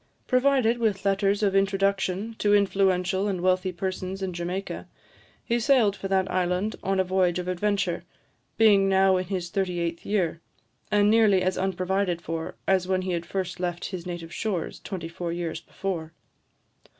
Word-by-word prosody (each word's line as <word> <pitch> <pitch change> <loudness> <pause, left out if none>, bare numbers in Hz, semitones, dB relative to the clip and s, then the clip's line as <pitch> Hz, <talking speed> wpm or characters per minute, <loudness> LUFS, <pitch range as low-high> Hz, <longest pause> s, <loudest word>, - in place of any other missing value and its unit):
Provided 255 -2 +3
with 205 -4 0
letters 195 +1 +2
of 195 -1 +2
introduction 195 +2 +1
to 205 0 +4
influential 190 -1 +2
and 190 -3 -1
wealthy 185 +1 +1
persons 185 +1 -4
in 185 -1 -3
Jamaica, 180 +3 -4 0.6
he 235 +1 +1
sailed 230 -4 +3
for 195 - -5
that 190 -1 +1
island 180 +3 0
on 195 0 0
a - - +4
voyage 185 -1 +1
of 180 0 -4
adventure; 185 -2 0 0.5
being 200 -3 +5
now 190 -1 +4
in 185 - -2
his 180 -2 -4
thirty 190 -3 -1
eighth 170 0 -3
year, 175 -5 -1 0.5
and 205 0 +4
nearly 215 -4 +4
as 185 0 +1
unprovided 185 -1 0
for 165 -1 -5
as 190 -1 +2
when 185 0 0
he 185 - -2
had 170 -1 -3
first 185 -1 -3
left 175 -1 -3
his 180 -2 -6
native 170 -2 -6
shores, 195 -7 -3
twenty 180 -5 -6
four 170 0 -5
years 170 -1 -3
before. 165 -4 -5
190 Hz, 165 wpm, -26 LUFS, 180-200 Hz, 0.6 s, being